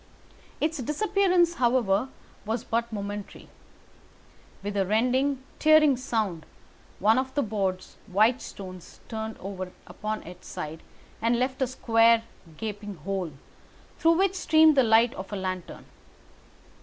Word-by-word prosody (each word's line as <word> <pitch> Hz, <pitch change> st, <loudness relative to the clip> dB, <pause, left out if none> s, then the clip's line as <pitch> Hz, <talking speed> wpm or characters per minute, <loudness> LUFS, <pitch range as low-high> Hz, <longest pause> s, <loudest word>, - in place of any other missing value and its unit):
Its 315 Hz, 0 st, -1 dB
disappearance, 360 Hz, -, +2 dB
however, 240 Hz, -, +2 dB, 0.3 s
was 220 Hz, +2 st, -2 dB
but 235 Hz, +1 st, -1 dB
momentary. 205 Hz, -1 st, -6 dB, 1.2 s
With 205 Hz, 0 st, -4 dB
a 195 Hz, -, +2 dB
rending, 255 Hz, +7 st, +1 dB, 0.2 s
tearing 310 Hz, -2 st, +6 dB
sound, 215 Hz, -9 st, -2 dB, 0.5 s
one 220 Hz, +5 st, +4 dB
of 265 Hz, +1 st, -4 dB
the 285 Hz, -, +2 dB
broad, 195 Hz, -4 st, -2 dB, 0.2 s
white 220 Hz, +6 st, +3 dB
stones 185 Hz, -2 st, -10 dB
turned 220 Hz, 0 st, -5 dB
over 185 Hz, -1 st, -6 dB
upon 215 Hz, 0 st, -5 dB
its 180 Hz, +1 st, -12 dB
side 155 Hz, +1 st, -6 dB, 0.4 s
and 230 Hz, +2 st, +2 dB
left 260 Hz, +2 st, -1 dB
a 260 Hz, -, +3 dB
square, 230 Hz, -2 st, +4 dB, 0.3 s
gaping 210 Hz, -1 st, -5 dB
hole, 180 Hz, -1 st, -4 dB, 0.7 s
through 330 Hz, +1 st, +5 dB
which 385 Hz, 0 st, +2 dB
streamed 315 Hz, -4 st, +5 dB
the 270 Hz, -, +6 dB
light 230 Hz, 0 st, +4 dB
of 190 Hz, +2 st, -8 dB
a -, -, -3 dB
lantern. 185 Hz, -2 st, -5 dB
225 Hz, 130 wpm, -27 LUFS, 195-265 Hz, 1.2 s, tearing